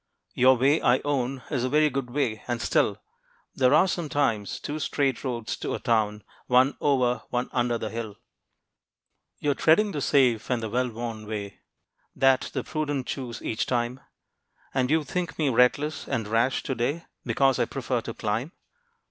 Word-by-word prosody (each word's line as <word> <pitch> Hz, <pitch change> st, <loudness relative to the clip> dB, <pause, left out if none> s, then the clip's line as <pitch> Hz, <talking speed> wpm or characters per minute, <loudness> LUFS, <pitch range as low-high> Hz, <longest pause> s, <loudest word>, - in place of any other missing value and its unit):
Your 130 Hz, +1 st, +5 dB
way 140 Hz, +5 st, +3 dB
I 120 Hz, +1 st, +4 dB
own 135 Hz, -3 st, -1 dB
Is 130 Hz, -4 st, 0 dB
a 130 Hz, -, 0 dB
very 150 Hz, +1 st, +3 dB
good 135 Hz, -3 st, -3 dB
way. 120 Hz, -5 st, -1 dB
And 120 Hz, -1 st, -1 dB
still, -, -, +1 dB, 0.6 s
There 130 Hz, -1 st, +3 dB
are 185 Hz, -, +5 dB
sometimes 145 Hz, -, -1 dB
two 150 Hz, +1 st, -4 dB
straight 140 Hz, -2 st, 0 dB
roads 120 Hz, -4 st, -3 dB
to -, -, -3 dB
a -, -, -5 dB
town, 110 Hz, -3 st, 0 dB, 0.2 s
One 130 Hz, +3 st, +4 dB
over, 125 Hz, -5 st, +2 dB
one 125 Hz, 0 st, -2 dB
under 120 Hz, -1 st, +1 dB
the 110 Hz, -1 st, -5 dB
hill. 110 Hz, -3 st, -5 dB, 1.2 s
You 145 Hz, -, 0 dB
are -, -, +2 dB
treading 185 Hz, +9 st, +3 dB
the 150 Hz, -, -3 dB
safe 125 Hz, -6 st, +2 dB
and 125 Hz, -3 st, 0 dB
the 110 Hz, -, -4 dB
well 125 Hz, +1 st, +1 dB
worn 115 Hz, -2 st, -6 dB
way, 100 Hz, -2 st, -5 dB, 0.6 s
That 135 Hz, -1 st, +3 dB
the -, -, -3 dB
prudent 145 Hz, -4 st, -2 dB
choose 125 Hz, -3 st, -5 dB
each 110 Hz, -, -2 dB
time; 120 Hz, +1 st, -1 dB, 0.7 s
And 130 Hz, -1 st, +1 dB
you 160 Hz, +1 st, +3 dB
think 175 Hz, +4 st, -3 dB
me 150 Hz, -3 st, +1 dB
reckless 130 Hz, +5 st, +2 dB
and 115 Hz, -6 st, -2 dB
rash 115 Hz, +4 st, +1 dB
to 135 Hz, -, -2 dB
day, 135 Hz, +8 st, -2 dB, 0.2 s
Because 135 Hz, -2 st, +2 dB
I -, -, +3 dB
prefer 130 Hz, -3 st, -2 dB
to 115 Hz, 0 st, -7 dB
climb. 110 Hz, +9 st, -2 dB
125 Hz, 175 wpm, -26 LUFS, 115-140 Hz, 1.2 s, Your